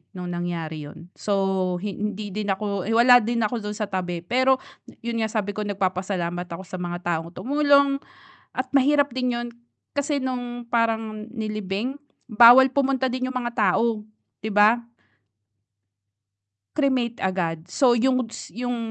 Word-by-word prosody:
nung 180 -1 -5
nangyari 165 -4 -4
'yun. 170 +3 -12
So, 195 -2 0
hi 205 - -2
hindi 210 -1 -4
din 210 -1 -3
ako 200 -1 -2
eh, 225 - +1
wala 245 +1 +8
din 230 +1 0
ako 230 +2 -2
do'n 210 - -5
sa 210 - -1
tabi, 180 -3 -3
pero 260 +4 +3 0.5
'yun 235 -1 -2
nga 220 - +1
sabi 205 -2 -1
ko 215 - -4
nagpapasalamat 185 -3 -2
ako 170 +3 -7
sa 185 0 -7
mga 175 0 -3
taong 170 -1 -2
tumulong 280 0 +3 0.6
at 255 0 -2
mahirap 285 +1 +4
din 250 -1 0
'yun 240 0 -3 0.5
kasi 285 0 0
nung 245 -2 -4
parang 225 -2 0
nilibing 215 +1 -3 0.4
bawal 240 +4 +9
pumunta 270 -1 +1
din 255 +1 -2
yung 255 - -3
mga 240 -1 -3 0.2
tao, 225 -2 +1 0.4
'di 220 - -3
ba? 215 +4 +5 1.9
Cremate 255 -5 0
agad. 175 -3 -2
So, 250 +5 +3
yung 255 -1 +1
s - - -8
yung 245 0 -3
220 Hz, 150 wpm, -24 LUFS, 190-250 Hz, 1.9 s, bawal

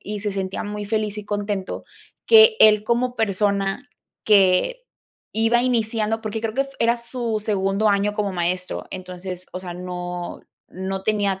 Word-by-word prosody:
y 210 0 -5
se 205 0 -2
sentía 190 -1 -3
muy 210 0 -5
feliz 215 -1 -1
y 210 - -6
contento, 205 -2 -3 0.4
que 445 0 +8
él, 215 -1 +7
como 240 +2 0
persona, 200 +3 0 0.3
que 205 - +3 0.5
iba 225 +2 +3
iniciando 225 -3 0
porque 215 +1 -3
creo 225 0 -3
que 275 - +2
f 275 - -11
era 235 +1 +3
su 235 -2 -3
segundo 200 0 +1
año 205 +1 +1
como 205 -2 -1
maestro. 180 +1 -2
Entonces, 185 0 -7
o 185 - -5
sea, 175 -2 -7
no 180 -1 -5 0.3
no 190 +1 -4
tenía 200 -2 0
205 Hz, 160 wpm, -22 LUFS, 190-225 Hz, 0.5 s, que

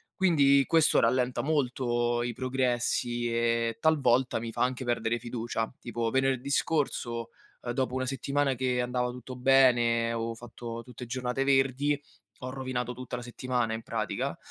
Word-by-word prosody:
Quindi 140 -7 +4
questo 160 -2 +4
rallenta 125 +1 +2
molto 120 -5 0
i 120 -1 -2
progressi 120 -2 -1
e 115 -1 +1
talvolta 135 -7 +3
mi 115 0 -5
fa - - -4
anche 130 +1 -1
perdere 120 -1 0
fiducia. 115 -1 -3
Tipo 120 -1 -2
venerdì 135 +1 +1
scorso, 120 -6 -1 0.3
ehm, 120 - -3
dopo 130 -1 -1
una 130 0 -1
settimana 140 +1 0
che 125 0 0
andava 125 0 -1
tutto 125 +1 -9
bene, 120 -3 +4
avevo 115 0 -3
fatto 115 0 -8
tutte 125 0 -9
giornate 125 +2 -2
verdi, 135 +1 +2 0.4
ho 130 - -5
rovinato 130 -2 -3
tutta 125 0 -6
la - - -6
settimana 120 -2 -2
in 110 - -4
pratica. - - -3
125 Hz, 150 wpm, -29 LUFS, 120-135 Hz, 0.4 s, Quindi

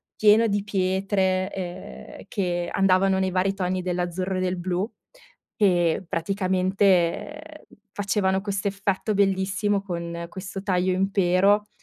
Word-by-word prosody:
pieno 215 +2 +5
di 205 -2 0
pietre, 190 -1 0
ehm, 180 -1 -8
che 175 -3 -2
andavano 190 0 +3
nei 190 -1 0
vari 190 +2 +1
toni 185 -1 -1
dell'azzurro 180 +1 -2
e - - -1
del 185 0 -1
blu 180 +3 -2 0.7
e, 175 -3 +2
praticamente, 190 - 0 0.3
facevano 195 -2 0
questo 200 0 -2
effetto 200 +1 -1
bellissimo 195 0 +1
con 170 -2 -5
questo 195 +1 -7
taglio 185 -2 +1
impero, 195 +2 +2
190 Hz, 115 wpm, -24 LUFS, 185-200 Hz, 0.7 s, pieno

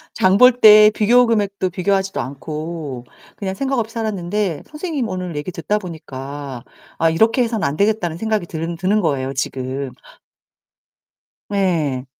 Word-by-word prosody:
장 190 +1 +3
볼 250 0 +6
때 215 -1 +8
비교 245 +4 +4
금액도 200 -4 0
비교하지도 195 +1 -1
않고 150 -1 -6 0.3
그냥 190 -2 -3
생각 270 0 -1
없이 225 0 -4
살았는데 205 -5 -2
선생님 300 -6 -3
오늘 180 -4 -5
얘기 145 +5 -4
듣다 205 +6 -1
보니까 140 - -8 0.3
'아 165 - +3
이렇게 225 +9 +3
해서는 225 -6 -1
안되겠다.'는 175 +1 0
생각이 215 -4 -1
드는 165 +1 -4
드는 190 +5 +1
거예요 135 -4 -1
지금. 130 0 -3 1.6
네. 165 -10 0
185 Hz, 305 characters per minute, -19 LUFS, 150-215 Hz, 1.6 s, 때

